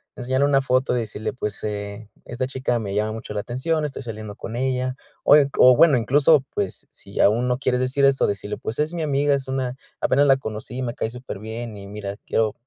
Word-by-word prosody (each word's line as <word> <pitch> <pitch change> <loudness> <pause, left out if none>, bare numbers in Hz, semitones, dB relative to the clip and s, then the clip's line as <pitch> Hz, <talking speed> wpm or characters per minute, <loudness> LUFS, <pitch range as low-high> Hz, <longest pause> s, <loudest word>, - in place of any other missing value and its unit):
Enseñarle 130 +2 +1
una 135 -1 +3
foto 130 -1 +1
y - - +1
decirle, 110 +1 -4
pues, 105 -5 -4
eh: 105 0 -5 0.2
"Esta 125 +2 -3
chica 130 -2 -1
me 100 -3 -4
llama 105 +1 0
mucho 115 -1 -7
la 105 - -2
atención, 150 +8 -1
estoy 140 -1 -5
saliendo 110 -3 -7
con 115 - -7
ella". 130 0 -1 0.3
Oy 145 -1 +6
o 125 0 +8
bueno, 150 -1 +6
incluso, 140 +5 +4
pues, - - -3
si - - -9
aún 115 +5 +3
no 125 0 +1
quieres 125 -2 +1
decir 130 +2 +2
eso, 135 -1 +3
decirle: 100 +1 -3
"Pues, 115 - -5
es 155 +3 0
mi 170 - -3
amiga, 145 -1 +2
es 135 -1 -4
una 130 -1 -2 0.3
apenas 140 +2 +3
la 135 -1 +6
conocí 110 0 -6
y - - -2
me 120 -2 -2
cae - - -2
superbién 115 -1 -7
y 100 0 -9
mira, 100 -1 -6
quiero 110 -2 +1
125 Hz, 220 wpm, -23 LUFS, 110-135 Hz, 0.3 s, o